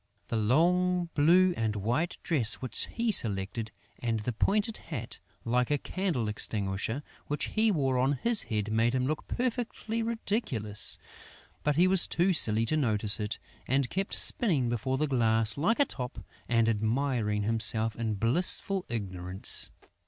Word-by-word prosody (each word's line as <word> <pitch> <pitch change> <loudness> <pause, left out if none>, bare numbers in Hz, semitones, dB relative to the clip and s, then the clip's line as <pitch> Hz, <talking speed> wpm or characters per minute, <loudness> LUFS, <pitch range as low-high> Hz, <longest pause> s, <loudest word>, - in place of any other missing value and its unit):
The - - -2
long 175 +10 +1
blue 175 +5 +4
and 110 -2 -2
white 120 - -2
dress 125 -10 +1
which 130 -4 -4
he 235 -1 -1
selected 110 - +2 0.3
and 115 -2 -2
the 120 +3 -4
pointed 210 - 0
hat, 125 -8 -7 0.3
like 125 +1 0
a 145 - +1
candle 165 - -3
extinguisher, 105 +4 -2 0.2
which 150 - -3
he 220 +1 +2
wore 135 -9 0
on 135 +3 +1
his 230 - +1
head 105 -1 -3
made 115 +3 +1
him 130 -1 0
look 155 +3 -4
perfectly 240 -2 -3
ridiculous; 205 - -1 0.6
but 150 -1 0
he 175 +4 +4
was 190 -1 +6
too 180 +2 +1
silly 110 -7 +4
to 155 - 0
notice 110 -6 +2
it 105 0 -3 0.3
and 135 -1 0
kept 195 +2 -2
spinning 155 - +4
before 120 +3 -2
the 155 - 0
glass 115 -5 +2
like 210 - 0
a 285 - +4
top 125 - -5 0.3
and 115 -1 +2
admiring 110 -1 -1
himself 110 0 +3
in 110 -2 -3
blissful 175 - +3
ignorance. 95 -4 -3
125 Hz, 150 wpm, -28 LUFS, 110-175 Hz, 0.6 s, was